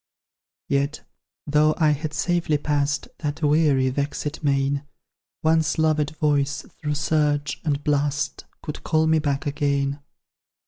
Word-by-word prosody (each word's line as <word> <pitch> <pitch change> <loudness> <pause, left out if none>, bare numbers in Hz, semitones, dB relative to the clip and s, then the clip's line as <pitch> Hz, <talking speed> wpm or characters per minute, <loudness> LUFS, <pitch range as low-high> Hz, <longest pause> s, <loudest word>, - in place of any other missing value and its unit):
Yet, 140 +2 0 0.4
though 150 +1 +3
I 155 -2 +4
had 150 +1 -2
safely 175 -4 +1
pass'd 145 0 -1
That 150 +1 -3
weary, 145 -3 +3
vexed 145 +3 -3
main, 140 0 +1 0.6
One 160 0 +4 0.2
loved 155 -1 +1
voice, 145 -2 +1
through 150 -1 -4
surge 150 -1 0
and 145 -3 -1
blast 145 +1 0 0.2
Could 150 - -6
call 160 -1 +2
me 160 0 +3
back 140 -2 -1
again. 140 -1 0
150 Hz, 125 wpm, -24 LUFS, 140-155 Hz, 0.6 s, I